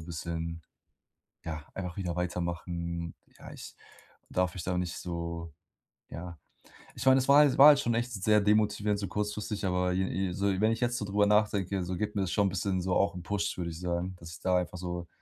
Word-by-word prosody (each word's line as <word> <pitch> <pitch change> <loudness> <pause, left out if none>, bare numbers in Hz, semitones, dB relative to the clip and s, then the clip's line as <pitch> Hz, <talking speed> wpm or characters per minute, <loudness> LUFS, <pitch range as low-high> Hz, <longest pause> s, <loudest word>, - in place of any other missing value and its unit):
bisschen, 85 0 -5 0.8
ja, 80 -2 -5
einfach 90 -2 -5
wieder 90 -4 -2
weitermachen. 85 -1 -3 0.3
Ja, - - -11
ich - - -10 0.6
darf 90 -2 0
mich 90 - -5
da 90 -1 -1
nicht 90 -1 -3
so, 85 -1 -5 0.6
ja 85 0 -7 0.6
ich - - -6
meine, 130 0 +7
das 130 0 +1
war 140 - +8
halt 145 -3 +5
war 140 - +10
halt 145 -2 +8
schon 120 - 0
echt 120 +2 -1
sehr 105 0 +3
demotivierend 105 0 +2
so 100 - -3
kurzfristig, 105 +2 -3
aber 90 -1 +1
je 95 +1 0
je 95 0 -1
so 100 +2 0
wenn 110 +2 +3
ich 115 - -5
jetzt 120 0 +1
so 105 - -3
drüber 105 +1 +2
nachdenke, 100 -2 +2
so 90 +1 -3
gibt 105 +3 -3
mir 100 - +1
das 95 - -3
schon 100 -2 +3
bisschen 95 0 -1
so 90 +1 -1
auch 100 -1 +2
'n 90 - -7
Push, 100 -2 -2
würde 85 -2 -3
ich 80 - -8
sagen, 90 +1 -2
dass 85 -1 -10
ich 85 - -11
da 90 -1 +2
einfach 90 0 -2
so: 90 -1 -5
90 Hz, 215 wpm, -30 LUFS, 85-105 Hz, 0.8 s, war